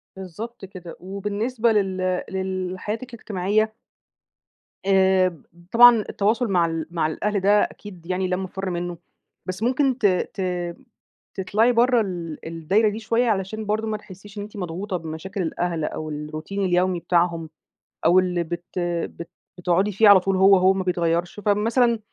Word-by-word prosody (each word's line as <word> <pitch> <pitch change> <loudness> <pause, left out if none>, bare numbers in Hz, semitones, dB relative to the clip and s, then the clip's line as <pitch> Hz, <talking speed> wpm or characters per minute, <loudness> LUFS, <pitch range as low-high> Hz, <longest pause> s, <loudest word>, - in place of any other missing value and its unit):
بالضبط 195 +4 -8
كده 180 -3 -10
وبالنسبة 210 +5 -1
لل 185 -3 0
لل 185 -1 -3
حياتِك 230 +5 -5
الاجتماعية 215 0 0 1.1
آآ 190 -4 +3 0.3
طبعًا 240 0 +8
التواصل 225 +5 +1
مع 180 -4 +2
ال 165 -1 -3
مع 165 -3 0
الأهل 200 +6 -1
ده 205 +2 +4
أكيد 185 -5 -8
يعني 185 +1 -1
لا 180 - 0
مفر 190 0 -4
منه، 175 0 -4 0.5
بس 185 +3 -4
ممكن 260 +1 +2
ت 235 - -1
ت 180 -2 -2 0.6
تطلعي 210 +5 +2
برا 240 0 +4
ال 170 -6 -5
الدايرة 165 +7 +1
دي 210 +2 -5
شوية 230 +2 +1
علشان 215 +1 -2
برضه 215 +2 -1
ما 215 -1 -2
تحسيش 205 +1 -14
إن - - -3
إنتِ 210 +1 -10
مضغوطة 185 +2 -3
بمشاكل 165 +4 -6
الأهل 170 -1 -2
أو 155 0 -5
الروتين 155 +6 -4
اليومي 180 0 +1
بتاعهم 170 -2 0 0.6
أو 175 +3 +6
اللي 180 -2 0
بت 175 +2 -6 0.4
بت 170 - -7 0.3
بتقعدي 180 +3 +1
فيه 205 +2 +5
على 200 -2 +9
طول 190 +1 0
هو 195 +1 +7
هو 185 +1 +4
ما 190 -1 -2
بيتغيرش، 175 +1 -1
فمثلا 225 +4 +2
190 Hz, 150 wpm, -23 LUFS, 175-210 Hz, 1.1 s, على